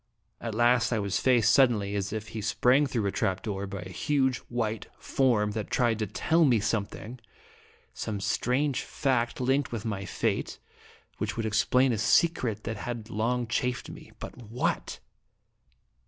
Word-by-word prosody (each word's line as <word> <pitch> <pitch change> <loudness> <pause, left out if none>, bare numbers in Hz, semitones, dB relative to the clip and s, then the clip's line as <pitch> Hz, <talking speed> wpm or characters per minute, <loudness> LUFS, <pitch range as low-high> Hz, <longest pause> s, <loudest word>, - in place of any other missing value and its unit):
At 115 -2 -5
last, 120 +1 +4
1 115 - +1
was 100 -1 -1
faced 125 -5 +4
suddenly, 110 -7 +3
as 100 -1 -2
if 110 -1 -5
he 110 - -5
sprang 125 +6 +3
through 120 -5 -1
a 100 - +1
trap 95 -1 -1
door, 100 -2 -3
by 100 -1 -6
a 90 - -8
huge 130 +5 +1
white 110 -3 -2
form 115 -6 +1
that 105 -1 -4
tried 120 -3 +1
to 110 - -1
tell 165 - +2
me 125 -7 +4
something, 110 +3 -3 0.7
some 105 -2 -4
strange 125 +7 0
fact 125 -4 -1
linked 130 +2 +1
with 115 -2 -4
my 100 -3 -3
fate, - - -2 0.6
which 105 0 -2
would 115 - -1
explain 120 +4 +3
a 110 - -2
secret 115 -4 +2
that 115 -1 -4
had 115 +1 -6
long 120 +3 0
chafed 125 +2 -2
me. - - -12
But - - -8
what? 120 +3 -2
115 Hz, 165 wpm, -28 LUFS, 105-125 Hz, 0.7 s, last